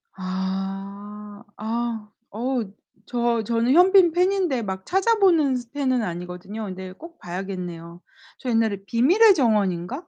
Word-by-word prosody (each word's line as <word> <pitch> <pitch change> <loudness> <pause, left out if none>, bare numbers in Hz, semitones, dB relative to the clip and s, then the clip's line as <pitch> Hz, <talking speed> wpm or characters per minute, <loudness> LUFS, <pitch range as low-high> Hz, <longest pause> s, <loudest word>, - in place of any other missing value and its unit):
아. 195 +2 -5
아. 225 0 -3 0.2
어우. 235 -1 -2 0.4
저 235 -2 0
저는 235 +3 +1
현빈 365 0 +6
팬인데 360 -7 +1
막 190 -3 -5
찾아보는 375 - +3
스 240 -1 -9
팬은 260 -4 0
아니거든요. 180 +3 -6
근데 185 -1 -7
꼭 335 - -13
봐야겠네요. 175 -2 -6 0.4
저 255 - -5
옛날에 225 -3 +1
비밀의 350 - +5
정원인가? 215 - 0
225 Hz, 260 characters per minute, -23 LUFS, 190-270 Hz, 0.4 s, 현빈